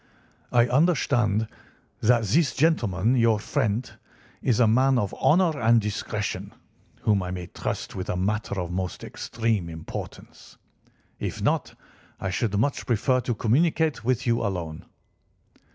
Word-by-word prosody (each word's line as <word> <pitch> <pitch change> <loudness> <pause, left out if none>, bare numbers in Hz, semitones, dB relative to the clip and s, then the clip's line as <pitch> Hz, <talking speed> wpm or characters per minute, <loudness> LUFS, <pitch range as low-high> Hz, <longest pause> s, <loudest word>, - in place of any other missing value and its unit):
I 120 -1 +5
understand 120 - +2 0.5
that 115 0 +4
this 125 - +2
gentleman, 120 - +2
your 115 -3 +4
friend, 105 +2 -1 0.5
is 125 -3 +1
a 120 - +6
man 130 +4 +4
of 100 -5 -1
honour 160 +2 +3
and 115 +1 +5
discretion, 105 0 -3 0.5
whom 105 -3 +2
I 90 - -4
may 90 -1 -5
trust - - -5
with 95 - -5
a - - -1
matter 100 +1 -1
of 90 -2 -3
the 90 - -4
most 95 -1 -4
extreme 110 -7 -2
importance. 80 -1 -9 0.6
If - - -4
not, - - 0 0.4
I 95 - -2
should 100 +2 -1
much 140 +7 0
prefer 125 +2 +2
to 120 -1 -2
communicate 155 +3 +1
with 125 +2 0
you 115 -1 +2
alone." 85 -5 -4
115 Hz, 140 wpm, -25 LUFS, 100-130 Hz, 0.6 s, a